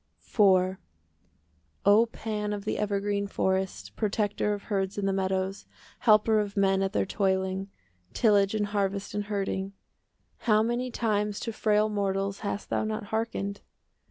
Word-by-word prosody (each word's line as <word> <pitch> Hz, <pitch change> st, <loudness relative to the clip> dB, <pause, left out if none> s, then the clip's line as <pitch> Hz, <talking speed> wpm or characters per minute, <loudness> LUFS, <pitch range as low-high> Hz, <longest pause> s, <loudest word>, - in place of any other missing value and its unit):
IV 190 Hz, -3 st, +4 dB, 1.1 s
O 210 Hz, +3 st, +6 dB
Pan 210 Hz, -2 st, -3 dB
of 205 Hz, 0 st, -5 dB
the -, -, -1 dB
evergreen 200 Hz, 0 st, 0 dB
forest, 190 Hz, -, -1 dB
Protector 210 Hz, 0 st, 0 dB
of 205 Hz, -1 st, -3 dB
herds 195 Hz, -2 st, -2 dB
in 205 Hz, -, -1 dB
the 195 Hz, -, +1 dB
meadows, 190 Hz, 0 st, -1 dB, 0.3 s
Helper 215 Hz, -1 st, +4 dB
of 205 Hz, 0 st, -3 dB
men 195 Hz, -1 st, +3 dB
at 195 Hz, 0 st, 0 dB
their -, -, +1 dB
toiling,— 190 Hz, 0 st, 0 dB, 0.4 s
Tillage 205 Hz, -2 st, +3 dB
and 210 Hz, -1 st, +1 dB
harvest 200 Hz, -1 st, -2 dB
and 205 Hz, 0 st, -2 dB
herding,— 195 Hz, -1 st, -2 dB, 0.8 s
How 215 Hz, 0 st, +5 dB
many 240 Hz, +2 st, -1 dB
times 210 Hz, -3 st, -1 dB
to 230 Hz, -, -3 dB
frail 215 Hz, 0 st, +2 dB
mortals 200 Hz, -1 st, -1 dB
5 -, -, -13 dB
Hast 205 Hz, -, -5 dB
thou -, -, +1 dB
not 215 Hz, 0 st, -3 dB
hearkened! 205 Hz, -3 st, -2 dB
205 Hz, 150 wpm, -28 LUFS, 195-215 Hz, 1.1 s, O